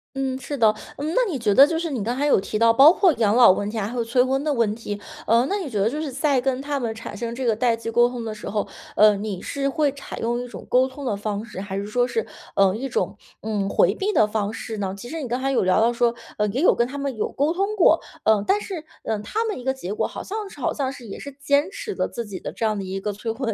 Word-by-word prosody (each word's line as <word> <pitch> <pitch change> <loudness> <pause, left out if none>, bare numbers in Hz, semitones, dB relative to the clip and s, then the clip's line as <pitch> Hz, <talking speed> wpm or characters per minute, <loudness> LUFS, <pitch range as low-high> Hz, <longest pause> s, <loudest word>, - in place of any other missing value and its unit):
嗯， 265 -1 -2
是 280 +2 -5
的。 220 -3 +5 0.2
嗯， 305 +3 -3
那 - - +4
你 290 - -2
觉 220 -4 +1
得 275 +7 +8
就 325 +1 -1
是 330 -1 -2
你 245 -7 -2
刚 240 +4 -2
才 285 - +1
有 295 - +4
提 215 - -3
到， 230 +1 +5
包 275 +7 +8
括 365 -1 +4
养 220 -4 +2
老 245 -5 +8
问 205 +2 -1
题 225 - -5
还 205 -1 -1
会 245 - -6
有 - - +1
催 235 +2 +3
婚 265 +2 0
的 305 - 0
问 230 -5 +1
题， 210 -2 -6 0.3
呃， 230 +3 +4
那 400 - 0
你 365 -8 -4
觉 215 -5 -2
得 200 - +3
就 300 +5 -3
是 300 -3 -4
在 275 0 +1
跟 260 0 0
他 285 0 -2
们 230 -3 -2
产 225 - -8
生 235 0 -4
这 260 +1 -3
个 230 -2 +3
代 235 +1 +2
际 230 0 -5
沟 240 +1 +4
通 245 -1 -5
的 220 - -3
时 210 - -7
候， 205 +1 -1 0.3
呃， 210 -1 +6
你 200 -2 -4
是 275 -1 -2
会 295 0 +1
采 275 - -9
用 240 +1 -1
一 245 - -6
种 245 - -10
沟 255 +1 +4
通 275 +1 -9
的 220 - 0
方 205 +1 -3
式？ 190 - -7
还 195 -1 -5
是 200 - -3
说 245 +4 +1
是， 455 - -1 0.3
呃， 195 -1 +4
一 265 +5 -4
种， 455 - -1 0.3
嗯， 205 -3 -2
回 190 0 +3
避 395 - -1
的 220 - +4
方 210 -1 -1
式 225 0 -6
呢？ 195 -2 -3
其 220 - -9
实 320 +4 -5
你 265 - -4
刚 245 +2 -1
才 270 +1 0
有 265 - +2
聊 185 +1 +3
到 235 +2 +3
说， 235 0 +1 0.2
呃， 210 - +1
也 235 +7 -2
有 360 - +6
跟 235 - +1
他 275 +3 -7
们 275 -2 -3
有 215 - -2
沟 295 +4 +1
通 395 +4 -1
过， 335 -4 +5 0.2
呃， 215 -2 +3
但 410 - +3
是， 370 -6 -6 0.2
呃， 220 - -1
他 325 - -2
们 440 - -3
一 - - -9
个 265 - +1
结 205 -7 -5
果 - - 0
好 - - -7
像 420 0 -5
是 295 - -14
好 255 - 0
像 270 -3 -2
是 255 -3 -11
也 200 - -8
是 280 - -7
坚 285 +4 +2
持 485 0 -6
的 - - -1
自 235 - -5
己 195 -3 -7
的 - - -6
这 225 - -3
样 215 -1 +1
的 - - -4
一 190 +1 -4
个 205 +1 -3
催 225 +3 -4
婚 240 +3 -4
的 225 - 0
240 Hz, 330 characters per minute, -23 LUFS, 215-280 Hz, 0.3 s, 得